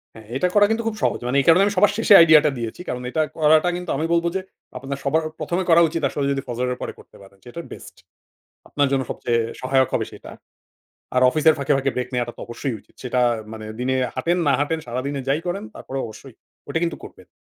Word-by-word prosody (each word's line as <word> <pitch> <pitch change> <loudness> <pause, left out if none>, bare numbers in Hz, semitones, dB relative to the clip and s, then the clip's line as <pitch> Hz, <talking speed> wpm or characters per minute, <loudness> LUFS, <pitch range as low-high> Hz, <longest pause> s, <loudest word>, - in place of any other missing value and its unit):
হ্যাঁ, 110 -1 -13
এটা 180 +7 +1
করা 205 - +7
কিন্তু 230 +1 0
খুব 220 - -2
সহজ। - - +1
মানে 130 +3 +1
এই - - -6
কারণে 165 +3 +7
আমি 205 - 0
সবার 205 +2 +5
শেষে 225 -2 +5
আইডিয়াটা 155 -2 +7
দিয়েছি। 115 +7 -5
কারণ 125 - -3
এটা 155 +5 0 0.2
করাটা 155 +2 +4
কিন্তু 180 -1 -7
আমি 160 - -1
বলব 170 0 +2
যে, 190 - 0 0.4
আপনার 135 +2 -5
সবার 155 +4 +1 0.2
প্রথমে 175 +2 -1
করা 170 +1 +7
উচিত 165 +1 -3
আসলে 145 - -2
যদি 135 - -1
ফজরের 125 +1 -2
পরে - - -4
করতে - - -18
পারেন। 100 0 -17
সেটা 120 +7 -9
best. - - -11 0.7
আপনার 145 -1 +1
জন্য 135 - +2
সবচেয়ে 120 -1 0 0.2
সহায়ক 130 0 +2
হবে - - +1
সেটা। - - -11 0.9
আর 125 - +3
অফিসের 155 +3 +4
ফাঁকে, 140 +1 -1
ফাঁকে 135 0 0
ব্রেক 125 0 -3
নেয়াটা 120 -1 -2
তো - - -13
অবশ্যই 120 +2 -4
উচিত। - - -28
সেটা 125 0 -1 0.3
মানে 110 -1 -8
দিনে 130 +1 0 0.2
হাঁটেন, 175 +2 0
না 140 - +4
হাঁটেন, 160 +2 0
সারাদিনে 135 +3 -3
যাই 140 +3 +2
করেন, 195 +4 -3
তারপরেও 135 0 -5
অবশ্যই 110 +4 -12 0.3
ওটা 165 - -1
কিন্তু 170 - -2
করবেন। - - -13
140 Hz, 215 wpm, -22 LUFS, 125-165 Hz, 0.9 s, করা